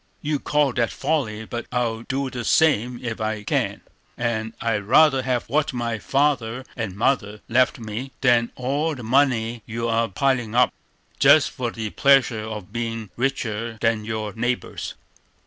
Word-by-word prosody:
You 150 -1 0
call 145 -3 +1
that 120 -1 +1
folly; 130 -8 -1
but 120 +1 -5
I'll 120 -2 -1
do 130 +2 -3
the 120 -1 -4
same 125 -5 +3
if 115 -2 -4
I 110 -1 -2
can; - - -1 0.4
and 115 -2 -2
I'd 115 -3 0
rather 135 +3 +5
have 125 -2 0
what 150 -1 0
my 120 -2 -2
father 130 -2 0
and 110 -6 -4
mother 105 -2 0
left 130 +5 +3
me, 115 +3 -6
than 120 -3 +3
all 145 +5 -1
the 125 - -9
money 120 -2 +2
you 115 +1 -3
are 115 0 +1
piling 120 +1 0
up, 125 0 +4 0.5
just - - +6
for 125 -2 -3
the 110 -2 -5
pleasure 135 -5 +4
of 105 -2 -7
being 115 -3 -4
richer 115 -3 -2
than 115 -1 +1
your 110 -1 -4
neighbors." 120 +2 -3
120 Hz, 160 wpm, -23 LUFS, 110-130 Hz, 0.5 s, just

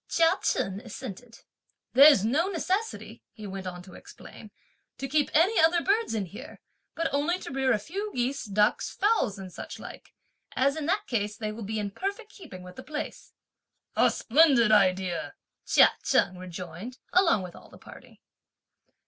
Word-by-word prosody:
Chia 330 -1 +4
Chen 195 +1 -1
assented. 230 0 -10 0.5
"There's 275 -6 +7
no 295 +10 +1
necessity," 390 +4 -3
he 215 -2 -10
went 190 -1 -6
on 180 -1 -7
to 185 - -14
explain, 215 - -13 0.5
"to 270 +2 -4
keep 295 +1 +1
any 370 +8 +3
other 330 +1 +4
birds 410 - +1
in 205 -3 -1
here, 195 +4 -11 0.4
but 330 -3 -2
only 295 +6 +1
to 370 - -9
rear 265 -1 +1
a 230 - +3
few 390 - -5
geese, 255 +3 -1
ducks, 210 0 +1
fowls 400 - +1
and 190 -2 -9
such - - -8
like; - - -12 0.4
as 275 +2 +2
in 310 -2 -4
that 405 +4 0
case 210 -3 -2
they 215 -1 -4
will 220 +2 -8
be 220 +1 -4
in 205 -1 -3
perfect 405 - -5
keeping 185 - -11
with 180 0 -12
the 260 - -8
place." 305 0 -7 0.6
"A - - +4
splendid 260 -4 +4
idea!" 185 -4 +2 0.3
Chia - - +6
Cheng 185 - +2
rejoined, 180 +6 -8 0.2
along 335 - +4
with 180 -1 -9
all - - -15
the - - -15
party. - - -15
245 Hz, 170 wpm, -27 LUFS, 200-325 Hz, 0.6 s, There's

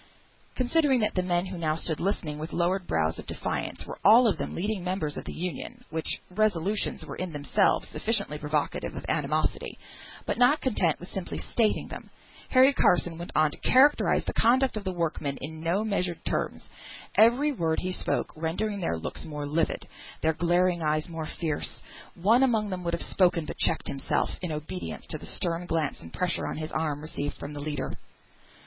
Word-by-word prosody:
Considering 265 +1 +3
that 210 - +1
the 185 - +1
men 175 0 +1
who 185 -2 -6
now 155 -2 +1
stood 160 -1 -3
listening 165 -5 -2
with 155 +2 -6
lowering 180 +2 +1
brows 80 0 0
of - - -9
defiance - - -3
were - - -8
all 230 +5 +8
of 210 - +1
them - - -3
leading 200 +1 -2
members 180 -5 -2
of - - -6
the - - -5
Union, 220 +8 -5
such 160 0 -1
resolutions 205 0 0
were - - -7
in 185 -2 -3
themselves 150 +7 +2
sufficiently 200 -9 0
provocative 150 0 -1
of - - -6
animosity: - - -1 0.5
but - - -2
not 250 +5 +5
content 195 - +1
with 175 - -9
simply 190 -2 -4
stating 225 -3 +1
them, - - -9 0.4
Harry 260 +2 +6
Carson 175 -7 +3
went 175 - -6
on 155 -1 +4
to - - -7
characterise 275 +3 +4
the - - -2
conduct 255 +2 +3
of 215 - -3
the 190 - 0
workmen 160 -5 -2
in 155 +3 -7
no 175 +6 +1
measured 180 -5 -1
terms; - - -2 0.5
every 245 +7 +5
word 165 - 0
he 185 - -2
spoke - - -1
rendering 185 +6 -2
their 85 - 0
looks 80 - -5
more 150 -2 -5
livid, 155 +3 0 0.4
their 160 0 +3
glaring 175 +2 +2
eyes 155 0 +1
more 160 -2 -4
fierce. 155 -3 -2 0.4
One 220 +8 +4
among 220 -6 +2
them 180 -1 -4
would 170 0 +1
have 170 - -3
spoken, 175 -4 +2
but - - -7
checked - - +2
himself 135 0 0
in 180 -3 -3
obedience 155 +5 -5
to 155 - -3
the - - -9
stern 170 0 -2
glance 160 -4 -1
and 80 - -11
pressure 180 -1 0
on - - -4
his 155 0 -4
arm, 150 -2 -1
received 145 -2 -4
from 145 - -7
the 145 - -6
leader. 150 0 -3
175 Hz, 190 wpm, -28 LUFS, 155-210 Hz, 0.5 s, all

